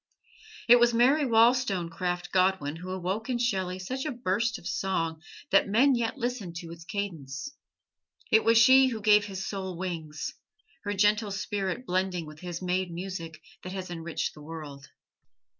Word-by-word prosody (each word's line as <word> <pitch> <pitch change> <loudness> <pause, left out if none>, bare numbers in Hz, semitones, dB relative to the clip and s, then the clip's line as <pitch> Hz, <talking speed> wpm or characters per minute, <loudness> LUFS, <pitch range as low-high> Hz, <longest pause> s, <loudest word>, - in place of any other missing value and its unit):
It 245 0 +8
was 240 0 +4
Mary 275 +6 +4
Wollstonecraft 190 -7 +2
Godwin 185 -5 +1
who 180 +2 -8
awoke 190 +5 -3
in 250 - +1
Shelley 190 -6 -1
such 255 +8 -4
a 305 - -2
burst 235 0 -1
of - - -15
song 165 -4 -2 0.3
that 195 +1 +4
men 260 +7 +4
yet 235 +2 -1
listen 240 -8 -3
to 170 -1 -7
its 170 0 -10
cadence. 170 - -5 0.8
It 220 0 +5
was 230 0 +5
she 260 +3 +7
who 230 -4 -3
gave 210 -1 +5
his 190 -2 -5
soul 190 -3 -4
wings: 165 -4 -4 0.5
her 205 0 -1
gentle 210 +2 +3
spirit 195 +2 -3
blending 185 -3 -1
with 155 0 -12
his 175 0 -6
made 180 0 0
music 170 -3 -6 0.2
that 185 - -7
has 185 -2 -5
enriched 165 -1 -3
the 150 - -13
world. 150 -3 -9
190 Hz, 160 wpm, -28 LUFS, 175-230 Hz, 0.8 s, It